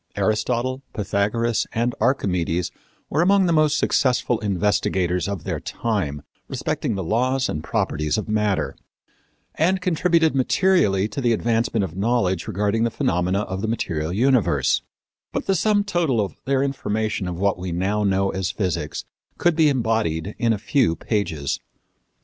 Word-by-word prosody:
Aristotle, 120 +4 0
Pythagoras 105 +3 0
and 120 +2 0
Archimedes 90 -8 0 0.4
were 155 - +1
among 195 +2 +4
the 170 - +2
most 155 -1 +3
successful 125 -5 +1
investigators 95 -4 0
of 100 -5 -4
their - - -3
time 90 -12 -2 0.2
respecting 110 - -2
the 95 - -3
laws 130 +8 +1
and 75 - -4
properties 75 +1 -1
of 110 - -3
matter, 105 -9 0 0.8
and 185 +4 +2
contributed 170 -2 +2
materially 130 - +2
to 140 - -4
the 120 -2 +3
advancement 115 -1 +1
of 85 -3 -5
knowledge 95 -4 0
regarding 105 +3 0
the 115 - +2
phenomena 90 -3 0
of 95 -2 -4
the 110 - -1
material 85 -8 -2
universe; 125 +3 +2 0.5
but - - -3
the 195 - +2
sum 205 +3 +2
total 175 - 0
of 100 -3 -1
their 135 0 +2
information 110 -7 -2
of 90 -1 -4
what 100 -2 +1
we 90 0 -4
now 95 +5 0
know 95 -1 +2
as 95 -1 -2
physics 85 -7 -3 0.3
could 175 -2 +2
be 155 -2 +5
embodied 110 - 0
in 115 -1 +2
a 110 - +1
few 105 - +1
pages. 80 - -2
110 Hz, 150 wpm, -23 LUFS, 95-130 Hz, 0.8 s, be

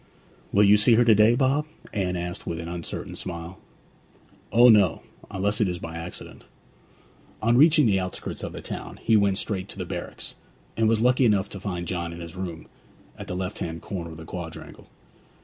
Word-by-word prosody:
'Will 100 - +5
you 105 +1 +7
see 110 +3 +5
her 120 +1 +4
to 115 - +7
day, 110 +3 +5
Bob?' 140 +4 +1 0.3
Anne 95 -3 -1
asked 90 0 -5
with 85 -1 -3
an 85 - -6
uncertain 85 -1 -6
smile. 85 0 -7 0.9
'O 120 +2 +7
no 100 -7 +5 0.3
unless 100 +3 -1
it 105 - +3
is 90 -1 -2
by 80 -1 -7
accident.' 85 +2 -8 1.0
On 115 +2 +2
reaching 150 +2 +6
the 100 -4 +3
outskirts 90 0 -5
of - - -5
the - - -7
town - - -7
he 110 - +4
went 100 -2 +3
straight 95 -3 -3
to - - -8
the - - -4
barracks, - - -6 0.4
and 110 -1 +2
was 110 -1 +2
lucky 125 +2 +4
enough 105 -5 +3
to 100 - -8
find 90 -3 -4
John 85 -2 -3
in 85 - -9
his 85 0 -8
room, 90 -4 -6 0.5
at - - -9
the 90 - -4
left 95 +2 -4
hand 80 -1 -5
corner 95 -6 -5
of 80 - -10
the 80 - -10
quadrangle. 85 -1 -8
95 Hz, 200 wpm, -25 LUFS, 85-110 Hz, 1.0 s, you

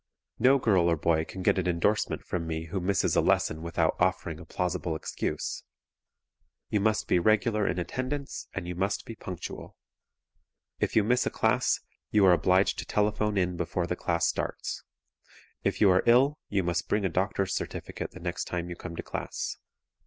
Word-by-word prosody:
No 130 +4 +6
girl 95 -9 +3
or 85 - +2
boy 80 0 +1
can 95 +3 -7
get 95 - +3
an 90 - -1
endorsement 90 +5 +1
from 85 -2 -3
me 80 0 -3
who 95 +3 -2
misses 95 0 +1
a - - +5
lesson 80 0 +1
without 85 0 0
offering - - 0
a - - -10
plausible 90 -2 -2
excuse. 80 - -3 1.1
You 105 - +2
must 110 +1 +1
be 90 - +3
regular 110 +2 +2
in 90 - 0
attendance 130 +10 -4
and 95 -2 -4
you 90 - -3
must 95 +3 -1
be 115 - -7
punctual. 95 -5 -7 1.0
If - - -1
you 110 - +5
miss 125 +4 +2
a - - +2
class - - +1 0.3
you 105 -2 +4
are 90 - +7
obliged 95 +2 +3
to - - -4
telephone 105 0 +1
in 90 -2 0
before 85 +1 -1
the 90 - -2
class 85 -1 0
starts. - - -2 0.8
If - - 0
you 100 -3 +7
are 90 - +4
ill 135 +6 +5
you 100 -2 +1
must 85 +1 -1
bring 105 -1 +1
a - - +4
doctor's 95 +2 0
certificate - - -4
the 90 - -12
next 85 0 -3
time 85 0 -4
you - - -4
come 85 -1 -8
to - - -5
class. - - -4
95 Hz, 185 wpm, -28 LUFS, 85-105 Hz, 1.1 s, are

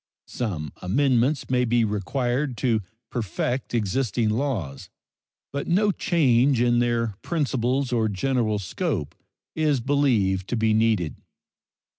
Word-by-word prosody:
Some 85 - -4
amendments 130 +6 +1
may 125 -1 +3
be 120 -1 +2
required 120 +6 -1
to 115 -4 +1 0.3
perfect 120 +4 -2
existing 115 +1 0
laws, 105 - -2 0.6
but 140 0 -3
no 205 +4 +3
change 135 -9 +2
in 120 0 +3
their 120 -2 0
principles 135 -4 -1
or 110 -2 +2
general 110 +1 0
scope 95 -5 -3 0.4
is 150 -4 +2
believed 115 -8 +1
to 120 - -1
be 110 -1 +2
needed. 110 -8 +1
120 Hz, 115 wpm, -24 LUFS, 110-135 Hz, 0.6 s, may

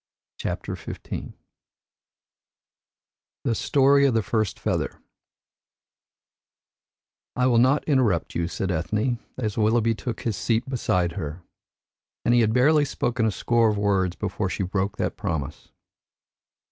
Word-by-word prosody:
CHAPTER - - -3
XV - - -8 2.4
THE 115 - +1
STORY 140 +3 +4
OF 125 - +1
THE 110 - +2
FIRST 110 -5 -1
FEATHER - - -2 2.4
"I 125 - +2
will 120 -2 +4
not 130 +4 +4
interrupt 125 - +1
you," 85 -1 -1
said 95 +1 -3
Ethne, 105 +9 -1 0.2
as 110 -3 -2
Willoughby 115 +1 +3
took 115 +1 -5
his 115 -4 -1
seat 115 +5 0
beside 90 -9 0
her, 80 +1 -6 0.8
and 120 - +4
he 120 - +5
had 110 -1 +3
barely 145 +6 +4
spoken 120 -4 0
a - - +1
score 115 +2 +2
of 105 - -1
words 95 -3 +1
before 100 -3 -2
she 95 - -2
broke 95 +2 -2
that - - -2
promise. 75 -2 -4
110 Hz, 130 wpm, -25 LUFS, 95-125 Hz, 2.4 s, he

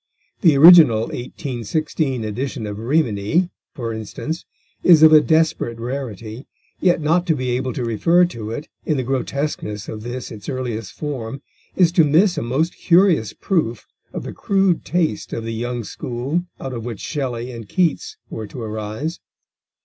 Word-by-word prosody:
The 160 -7 +5
original 155 -8 +8
1816 130 - -3
edition 110 +2 -4
of 105 0 -5
Rimini, 125 - +1 0.2
for 115 -3 -4
instance, 110 - -5 0.4
is 165 -3 +6
of 155 0 +8
a 155 - +9
desperate 155 -7 +1
rarity, 120 -2 -6 0.3
yet 175 -3 +2
not 170 +4 +1
to 160 - +3
be 130 -2 -2
able 130 +1 -1
to 125 - -3
refer 165 +11 +3
to 115 -11 -6
it 145 +7 -5 0.2
in 155 - 0
the 130 - -1
grotesqueness 130 -5 -3
of 110 - -6
this 120 +2 -6
its 105 +2 -8
earliest 120 -6 -4
form 135 -3 -5 0.3
is 175 -3 +4
to 170 -2 +5
miss 170 +6 +4
a - - -2
most 135 +9 -1
curious 175 - +3
proof 135 - -1 0.3
of - - -5
the - - -6
crude 195 -3 +1
taste 175 -3 -1
of 115 - -3
the 115 0 -4
young 120 +1 -3
school 130 +11 -3
out 135 - -5
of 115 -2 -5
which 115 -4 -6
Shelley 125 -4 -3
and 115 -4 -9
Keats 175 -4 0
were 110 -1 -6
to 125 - -9
arise. 110 +8 -4
130 Hz, 165 wpm, -21 LUFS, 115-160 Hz, 0.4 s, a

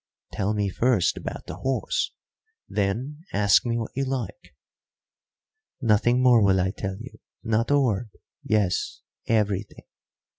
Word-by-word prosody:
"Tell 100 +2 0
me 105 -1 0
first 115 0 +2
about - - -6
the - - -7
horse, 135 0 -1 0.6
then 115 +9 -2
ask 100 +3 +4
me 115 0 0
what 115 -2 -4
you 135 - -1
like." 135 - -5 1.2
"Nothing 120 +1 +3
more 125 -3 +6
will 95 -2 +4
I 95 +1 +1
tell 95 -1 -5
you 125 +3 -11 0.2
not 115 0 +1
a 145 0 +4
word. 115 -4 0 0.3
Yes, 105 -4 0 0.3
everything. 105 -2 -1
110 Hz, 135 wpm, -25 LUFS, 100-125 Hz, 1.2 s, more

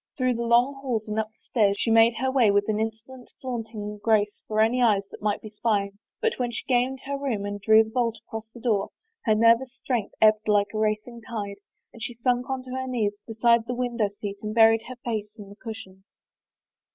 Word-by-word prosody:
Through 255 -2 +2
the 235 - -3
long 240 +4 +3
halls 235 -5 -2
and 210 +1 -2
up 220 - -1
the 220 - -42
stairs 205 -4 +1
she 225 - +1
made 225 +1 +6
her 260 +2 0
way 255 -5 +4
with 205 0 +2
an 215 -1 0
insolent, 225 +3 -6
flaunting 220 -4 -5
grace 210 -2 +2
for 215 0 -1
any 230 +3 +3
eyes 210 -5 +4
that - - -11
might 210 0 -1
be 215 - -7
spying, 205 -2 -1 0.2
but 455 - -1
when 245 -1 0
she 235 - -5
gained 255 +1 +1
her 280 0 -3
room 235 -8 -2
and 205 0 -5
drew 220 +2 +6
the 220 - -11
bolt 230 -2 0
across 220 0 -8
the 240 - -12
door, 220 -5 0 0.4
her 215 -3 +4
nervous 230 +3 +4
strength 245 -6 -3
ebbed 215 0 +4
like 205 0 +2
a 215 - -2
racing 215 +2 -1
tide 205 -3 -5 0.4
and 230 - -13
she 240 - -4
sunk 245 +1 0
on 265 -1 -2
her 260 0 -4
knees 210 -5 -1
beside 230 0 +2
the 245 - -2
win 245 -1 -2
dow 215 -3 +2
seat 200 0 -7
and 215 +1 -4
buried 225 0 +6
her 255 0 -8
face 215 -3 -3
in 205 -2 -10
the 200 - -12
cushions. 210 -4 -10
225 Hz, 225 wpm, -26 LUFS, 210-245 Hz, 0.4 s, made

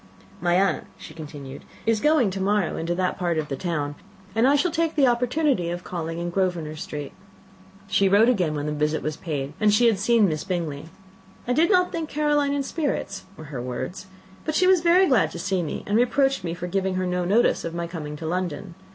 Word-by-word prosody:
"My 175 0 +2
aunt," 195 +2 +1
she - - -11
continued, 145 -4 -9 0.2
"is 225 -1 +2
going 300 -6 +3
to 190 +1 -4
morrow 200 -2 +1
into 170 +2 -2
that 180 0 -1
part 175 -3 0
of 155 -1 -2
the 135 - -2
town, 145 -2 -2 0.4
and 225 +3 +3
I 280 - +5
shall 335 +5 +2
take 330 0 0
the 285 -3 +4
opportunity 250 - +1
of 175 +1 -4
calling 165 -2 -4
in 175 0 -3
Grosvenor 175 -4 -1
Street." 145 -2 -6 0.8
She 195 0 +3
wrote 205 +4 +5
again 180 -11 +2
when 145 0 -3
the 150 - -2
visit 150 +1 -1
was 155 0 -2
paid, 145 -4 -4
and 215 -1 +4
she 210 +4 +4
had 225 -4 +3
seen 225 0 +4
Miss 155 -3 -2
Bingley. 165 -6 -3 0.6
"I 245 - +2
did 325 +7 +3
not 365 -3 +3
think 325 -2 -3
Caroline 295 -1 +1
in 280 - 0
spirits," 280 - -3
were 150 -1 -10
her 125 - -3
words, 130 +9 -5 0.4
"but 310 - -2
she 365 - +4
was 370 -2 +5
very 350 +3 +5
glad 260 -7 +3
to - - -6
see 190 -1 -1
me, 160 - -4
and 205 - -1
reproached 270 -1 +2
me 170 -1 -3
for 175 - -5
giving 190 +1 -1
her 185 0 0
no 180 0 -1
notice 205 +7 +2
of 165 0 -5
my 170 0 -2
coming 160 -3 -6
to 160 - -7
London. 175 0 -3
185 Hz, 220 wpm, -24 LUFS, 160-250 Hz, 0.8 s, I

